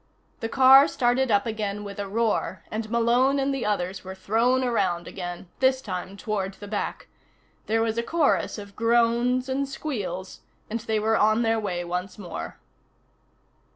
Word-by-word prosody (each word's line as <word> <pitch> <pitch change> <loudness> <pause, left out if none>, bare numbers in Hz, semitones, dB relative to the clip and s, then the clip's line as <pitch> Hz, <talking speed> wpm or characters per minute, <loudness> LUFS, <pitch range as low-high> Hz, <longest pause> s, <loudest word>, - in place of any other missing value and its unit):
The 225 -3 -3
car 265 +3 +7
started 255 -2 +1
up 205 -2 +3
again 210 -2 -3
with 200 -1 -8
a 200 - -3
roar 210 -4 -1
and 215 0 -3
Malone 240 +4 +3
and 275 0 0
the 265 -5 -2
others 195 -2 -2
were 190 0 -7
thrown 235 +7 +1
around 185 -8 0
again, 175 -1 -6
this 260 0 +3
time 190 -4 -6
toward 200 -3 -3
the 205 - -10
back. 205 0 -4 0.6
There 225 +1 +2
was 225 0 -1
a - - +2
chorus 305 +1 +1
of 200 -1 -10
groans 235 +2 +2
and 270 +1 -1
squeals, 195 - -5 0.3
and 230 - -1
they 220 -1 -1
were 220 +1 +2
on 215 +2 +3
their 225 0 +2
way 180 -5 -3
once 180 +2 -4
more. 190 -4 -7
220 Hz, 165 wpm, -25 LUFS, 200-245 Hz, 0.6 s, car